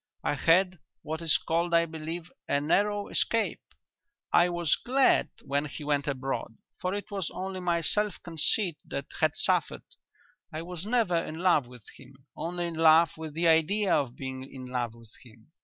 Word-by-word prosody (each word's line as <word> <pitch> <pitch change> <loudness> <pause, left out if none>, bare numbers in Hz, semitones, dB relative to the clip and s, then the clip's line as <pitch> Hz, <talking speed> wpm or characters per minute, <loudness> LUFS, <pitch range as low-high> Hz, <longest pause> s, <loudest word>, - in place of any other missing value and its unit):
I - - +1
had 180 +5 +3 0.2
what 160 +1 -4
is 165 -3 +3
called, 170 +1 0
I 170 0 +5
believe, 165 +2 -6 0.2
a 140 - +3
narrow 205 +7 +1
escape. 225 -1 0 0.7
I 175 +1 +5
was 175 -3 +1
glad 265 +2 +3
when 140 +2 -1
he 150 +1 -7
went 145 -1 0
abroad, 130 -4 -3 0.2
for 185 +2 -1
it 205 +1 -6
was 195 -4 -2
only 190 0 -5
my 175 -2 0
self 210 +4 +1
conceit 170 +1 0
that 140 - -4
had - - +2
suffered. - - 0 0.7
I 155 +1 -5
was 180 +2 -7
never 220 -7 +2
in 165 -1 -3
love 170 -7 +3
with 125 -3 -14
him: 135 0 -17
only 175 +1 -3
in 170 - -4
love 160 0 +6
with 160 -2 -8
the 170 +1 +2
idea 170 +5 +3
of 130 -4 0
being 130 -1 -6
in 130 -1 -9
love 125 -2 -3
with 115 -2 -16
him. 115 +3 -19
165 Hz, 175 wpm, -28 LUFS, 140-180 Hz, 0.7 s, love